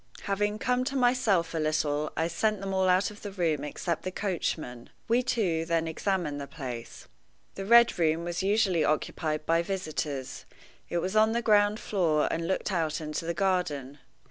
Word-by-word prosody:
Having 205 +1 0
come 250 +2 0
to 275 +1 -3
myself 245 -10 +2
a 165 - -1
little, 150 -1 0
I 160 - +1
sent 210 +5 0
them 195 0 -4
all 190 -1 +2
out 185 +3 +3
of 210 - -14
the 205 - -6
room 165 -6 0
except 165 +3 -3
the - - -3
coachman. 160 - -3 0.2
We 235 +2 +3
two 185 -10 0
then 165 0 0
examined 160 -3 -2
the 140 - -6
place. 130 -6 -7 0.5
The 195 0 -6
Red 235 -3 +6
Room 160 0 +2
was 175 +1 -3
usually 195 -4 +2
occupied 155 0 -1
by 165 +1 +3
visitors. 155 -7 -4 0.4
It 175 - -1
was 185 +4 -2
on 220 +1 +4
the 235 0 -1
ground 210 0 +4
floor, 165 -7 +1
and 165 0 -2
looked 190 +2 -1
out 160 -4 0
into 155 +2 -4
the 170 0 -2
garden. 155 -7 -1
175 Hz, 180 wpm, -28 LUFS, 155-205 Hz, 0.5 s, Red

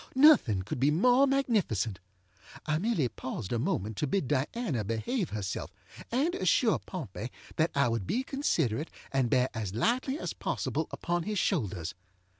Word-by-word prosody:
Nothing 260 - +6
could 105 - -4
be 135 +3 +4
more 245 - +5
magnificent. 205 - +1 0.7
I 155 0 +1
merely 185 - +1
paused 115 -2 -5
a 120 - +1
moment 105 -2 -1
to 150 - 0
bid 150 -1 0
Diana 145 - -1
behave 135 - -1
herself, 105 -3 -4 0.4
and 285 +9 +1
assure 200 +5 +3
Pompey 130 - -6 0.3
that 160 +1 +3
I 140 -2 +4
would 115 -5 -1
be 255 - 0
considerate 160 - 0 0.2
and 135 -3 +1
bear 125 +1 +3
as 105 -4 -4
lightly 255 - +1
as - - -4
possible - - -2
upon 175 0 -2
his 210 +4 -3
shoulders. 100 - -1
150 Hz, 155 wpm, -30 LUFS, -, 0.7 s, Nothing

